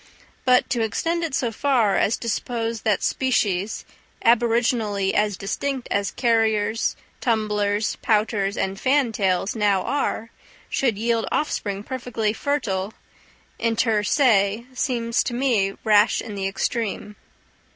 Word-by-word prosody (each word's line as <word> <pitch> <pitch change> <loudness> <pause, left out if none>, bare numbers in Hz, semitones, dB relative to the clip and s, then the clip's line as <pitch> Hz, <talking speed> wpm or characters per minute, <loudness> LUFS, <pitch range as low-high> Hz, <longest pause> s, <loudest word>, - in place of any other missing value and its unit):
But 250 -1 +4
to 240 - +1
extend 330 +10 -1
it 320 -5 -2
so 240 -3 0
far 235 -4 +2
as 215 - +2
to 235 - -7
suppose 230 0 -2
that 215 -3 +1
species, 210 -6 0 0.4
aboriginally 230 -4 +2
as 210 -2 +1
distinct 255 +6 -3
as 200 -1 +1
carriers, 225 -2 +1 0.2
tumblers, 210 -2 0
pouters, 210 -2 +1
and 195 0 -2
fantails 220 -9 +1
now 205 -4 +2
are, 245 -4 -2 0.4
should 240 -7 +1
yield 230 +1 0
offspring 200 -9 -2
perfectly 235 -4 -2
fertile, 220 -8 -2 0.6
inter 225 -1 +1
se, 215 -3 +2
seems 235 -3 0
to 240 - -3
me 230 -7 +1
rash 210 0 +4
in 220 - -6
the 195 -1 -2
extreme. 210 +1 -3
225 Hz, 120 wpm, -23 LUFS, 205-240 Hz, 0.6 s, But